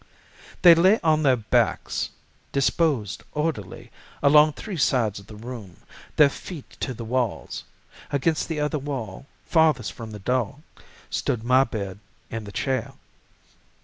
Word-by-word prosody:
"They 175 -2 +11
lay 185 +6 +5
on 155 -2 +3
their 135 -4 +4
backs, 110 -3 0 0.4
disposed 140 - +1
orderly 120 - -3 0.3
along 150 +1 +6
three 205 +5 -6
sides 120 -8 +1
of 100 - -16
the 110 - -11
room, 110 -4 -9 0.4
their 150 - +7
feet 150 +2 -8
to 130 - -3
the 115 0 -7
walls—against 130 +5 -3
the 160 -2 -3
other 150 +1 0
wall, 135 -4 -5 0.2
farthest 155 - +2
from 115 -2 -8
the 105 - -7
door, 125 +4 -1 0.5
stood 110 -2 -1
my 130 +3 +4
bed 100 -4 -5 0.3
and 110 -2 -5
the - - -7
chair. 130 +3 -2
130 Hz, 135 wpm, -25 LUFS, 110-150 Hz, 0.5 s, They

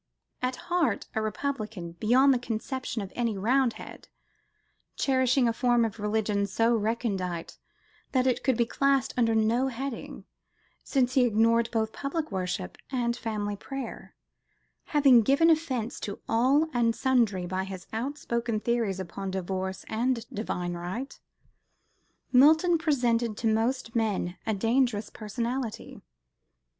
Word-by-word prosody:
At 255 0 -1
heart 340 - 0
a 220 - 0
Republican 215 -5 -3
beyond 245 +10 +4
the 250 - 0
conception 240 0 -4
of 195 - -9
any 230 -4 -1
Roundhead, 240 +3 -1 0.9
cherishing 260 -1 +2
a 230 - +1
form 240 -1 +2
of 225 0 -5
religion 210 -1 0
so 225 +4 +2
recondite 205 -6 -2 0.5
that 255 -1 +2
it 255 -2 +1
could 260 -3 +2
be 235 - +3
classed 275 +1 +1
under 230 -2 +2
no 225 +4 +2
heading, 265 0 -6 0.6
since 255 -3 +1
he 260 - +4
ignored 230 +1 +3
both 220 -1 -1
public 300 0 -3
worship 180 -2 -3
and 240 -3 0
family 210 -3 -3
prayer, 270 +3 -7 0.7
having 275 -5 +5
given 280 +9 +4
offence 260 -8 -1
to 200 - -5
all 265 +7 +3
and 230 -2 +2
sundry 230 -8 +1
by 185 +1 -2
his 190 -1 -7
outspoken 235 -2 -2
theories 225 -4 0
upon 190 +2 -5
divorce 190 0 -3
and 230 +1 -1
divine 180 -4 -3
right, 180 +10 -5 1.1
Milton 315 +6 +5
presented 240 -8 +1
to - - -5
most 225 +2 0
men 205 -6 0
a 220 - +1
dangerous 225 0 +1
personality. 235 +2 -4
230 Hz, 130 wpm, -28 LUFS, 210-260 Hz, 1.1 s, having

